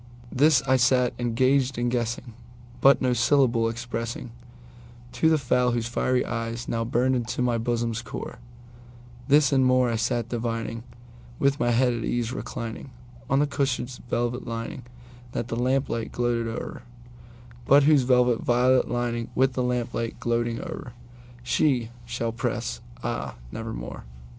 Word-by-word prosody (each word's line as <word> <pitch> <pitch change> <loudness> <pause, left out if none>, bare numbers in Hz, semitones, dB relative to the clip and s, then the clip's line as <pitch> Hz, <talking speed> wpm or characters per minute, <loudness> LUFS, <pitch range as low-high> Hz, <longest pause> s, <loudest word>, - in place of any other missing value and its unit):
This 145 0 +4
I 130 0 +3
sat 125 0 +3
engaged 130 +2 +2
in 120 0 0
guessing, 120 0 -2 0.5
but 135 +1 +6
no 125 -1 +3
syllable 120 -1 +3
expressingTo 115 +1 -4 0.8
the 160 -1 +3
fowl 125 -3 +1
whose 120 -1 -1
fiery 125 +1 0
eyes 115 0 -4
now 115 0 -1
burned 125 +3 +1
into 125 +1 -1
my 120 -2 +1
bosom's 115 0 -1
core; 115 - -7 0.9
This 145 0 +5
and 135 -1 +4
more 130 -1 +3
I 115 - 0
sat 120 0 0
divining, 115 -1 -3 0.6
with 140 +1 +2
my 120 - +2
head 125 +1 +3
at 115 -1 -3
ease 120 +1 -1
recliningOn 115 0 -6 0.5
the 145 - +4
cushion's 135 -3 -2
velvet 120 +2 -1
lining 115 +1 -5 0.5
that 120 - -3
the - - -2
lamplight 125 -1 0
gloated 120 -1 0
o'er, 115 +1 -5 0.9
But 140 +1 +7
whose 150 -1 +5
velvet 125 -2 +3
violet 125 +2 +3
lining 120 -1 -2
with 130 +1 +3
the 125 - -1
lamp 125 -1 -1
light 115 0 -3
gloating 120 0 -1
o'erShe 120 +1 -3 0.2
shall 115 -1 -2
press, 115 +1 -3 0.2
ah, - - -3 0.2
nevermore! - - -6
120 Hz, 140 wpm, -26 LUFS, 115-130 Hz, 0.9 s, But